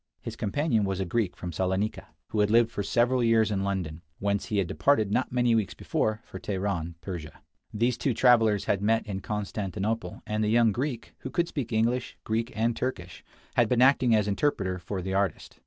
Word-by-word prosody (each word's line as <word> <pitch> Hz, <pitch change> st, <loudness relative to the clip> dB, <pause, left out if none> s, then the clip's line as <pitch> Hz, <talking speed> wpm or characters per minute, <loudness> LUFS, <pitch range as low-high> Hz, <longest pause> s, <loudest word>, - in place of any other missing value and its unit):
His -, -, -7 dB
companion 115 Hz, +1 st, 0 dB
was 95 Hz, -1 st, -1 dB
a 95 Hz, -, -1 dB
Greek 105 Hz, 0 st, -1 dB
from 90 Hz, -, -5 dB
Salonica, 95 Hz, +5 st, -1 dB, 0.2 s
who 110 Hz, -, -2 dB
had 105 Hz, 0 st, +3 dB
lived 115 Hz, +1 st, +4 dB
for 105 Hz, -, -3 dB
several 120 Hz, +4 st, +2 dB
years 115 Hz, -2 st, +3 dB
in 95 Hz, -1 st, 0 dB
London, 90 Hz, -5 st, -3 dB, 0.2 s
whence 100 Hz, 0 st, -1 dB
he 105 Hz, -, -2 dB
had 100 Hz, -, +2 dB
departed 105 Hz, +3 st, +2 dB
not 130 Hz, -, 0 dB
many 120 Hz, -1 st, +2 dB
weeks 110 Hz, -4 st, 0 dB
before, 110 Hz, 0 st, -1 dB
for -, -, -9 dB
Teheran, 95 Hz, -4 st, -2 dB
Persia. 85 Hz, -5 st, -7 dB, 0.3 s
These 120 Hz, +3 st, 0 dB
two 130 Hz, -5 st, 0 dB
travelers 115 Hz, -5 st, +4 dB
had 100 Hz, -, 0 dB
met 110 Hz, +2 st, +2 dB
in 100 Hz, -3 st, -4 dB
Constantinople, 105 Hz, 0 st, -3 dB
and 110 Hz, 0 st, -1 dB
the 105 Hz, -, +1 dB
young 115 Hz, 0 st, +4 dB
Greek, 125 Hz, +1 st, -3 dB
who -, -, -6 dB
could 170 Hz, 0 st, 0 dB
speak 130 Hz, -8 st, -4 dB
English, 120 Hz, +3 st, 0 dB
Greek, 115 Hz, +2 st, -1 dB
and 115 Hz, +1 st, +1 dB
Turkish, 90 Hz, -10 st, -4 dB, 0.3 s
had 120 Hz, -3 st, +3 dB
been 125 Hz, 0 st, +4 dB
acting 130 Hz, -3 st, +5 dB
as 105 Hz, -1 st, +2 dB
interpreter 100 Hz, -5 st, 0 dB
for 95 Hz, +1 st, -5 dB
the 95 Hz, +1 st, -3 dB
artist. 95 Hz, -4 st, -2 dB
105 Hz, 200 wpm, -27 LUFS, 95-120 Hz, 0.3 s, acting